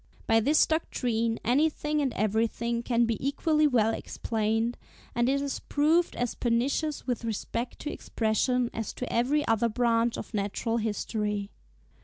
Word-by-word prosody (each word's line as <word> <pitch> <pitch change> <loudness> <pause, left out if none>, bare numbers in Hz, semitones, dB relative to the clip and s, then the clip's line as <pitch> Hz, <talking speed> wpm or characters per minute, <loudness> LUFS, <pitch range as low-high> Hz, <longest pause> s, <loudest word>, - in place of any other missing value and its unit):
By 225 - +4
this 295 +7 +4
doctrine, 235 -8 -1
anything 300 +3 +1
and 270 -3 0
everything 230 +3 0
can 235 0 +2
be 230 0 -2
equally 305 +2 +2
well 225 -5 +2
explained; 225 +2 -1 0.4
and 240 +1 +2
it 275 +1 +1
has 280 -1 -3
proved 320 +4 +2
as 245 -1 -1
pernicious 265 +6 0
with 245 -2 -2
respect 230 +2 -3
to 300 - -3
Expression 240 +2 0
as 225 -2 -4
to 250 - -5
every 280 +6 +1
other 225 +1 +2
branch 230 0 +1
of - - -7
natural 210 +3 -1
history. 210 -2 -2
235 Hz, 145 wpm, -28 LUFS, 225-275 Hz, 0.4 s, By